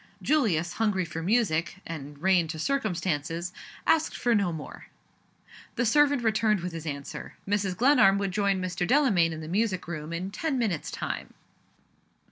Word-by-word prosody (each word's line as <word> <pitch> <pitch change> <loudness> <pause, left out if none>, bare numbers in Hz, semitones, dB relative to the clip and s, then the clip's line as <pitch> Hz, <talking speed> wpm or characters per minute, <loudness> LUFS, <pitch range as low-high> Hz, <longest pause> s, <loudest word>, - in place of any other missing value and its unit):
Julius, 185 - +1
hungry 205 -5 0
for 165 0 -5
music, 180 -4 +1
and 145 -3 -7
reigned 180 -1 +3
to 160 - -4
circumstances, 175 - -1 0.3
asked 320 -1 +2
for 240 - +2
no 200 -5 +2
more. 160 -2 -8 0.9
The 240 - +1
servant 285 +2 +4
returned 215 -3 +2
with 180 0 -4
his 165 -1 -6
answer. 140 -2 -6
Mrs. 195 -2 0
Glenarm 245 -6 +5
would 200 -1 -1
join 200 -1 +1
Mr. 180 -1 -2
Delamayn 220 - +4
in 160 0 -6
the 155 - -7
music 190 0 0
room 155 -2 -5
in 180 +3 -4
ten 275 +6 -2
minutes' 210 -10 -1
time. - - -5
190 Hz, 155 wpm, -27 LUFS, 165-225 Hz, 0.9 s, Glenarm